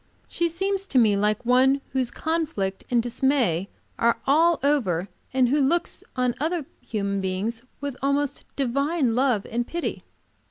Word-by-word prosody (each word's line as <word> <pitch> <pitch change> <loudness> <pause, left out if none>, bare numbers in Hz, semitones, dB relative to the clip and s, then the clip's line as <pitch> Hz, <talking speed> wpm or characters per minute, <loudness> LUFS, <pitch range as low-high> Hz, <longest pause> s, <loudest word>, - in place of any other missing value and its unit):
She 340 0 0
seems 385 +3 -2
to 270 - 0
me 220 -4 +5
like 210 +3 0
one 260 +3 +4
whose 260 -2 0
conflict 310 -14 -2
and 240 -2 +2
dismay 240 - +1 0.3
are 235 0 +3
all 320 +4 +4
over, 205 - +1 0.2
and 255 -2 +3
who 290 +3 +3
looks 335 +6 0
on 250 -1 +1
other 320 +1 -1 0.2
human 200 -3 -2
beings 195 +5 -2 0.2
with 285 -1 -3
an - - -18
almost 280 +1 0
divine 275 0 +1
love 245 -4 +2
and 240 +1 -1
pity. 345 0 -3
260 Hz, 155 wpm, -25 LUFS, 225-290 Hz, 0.3 s, me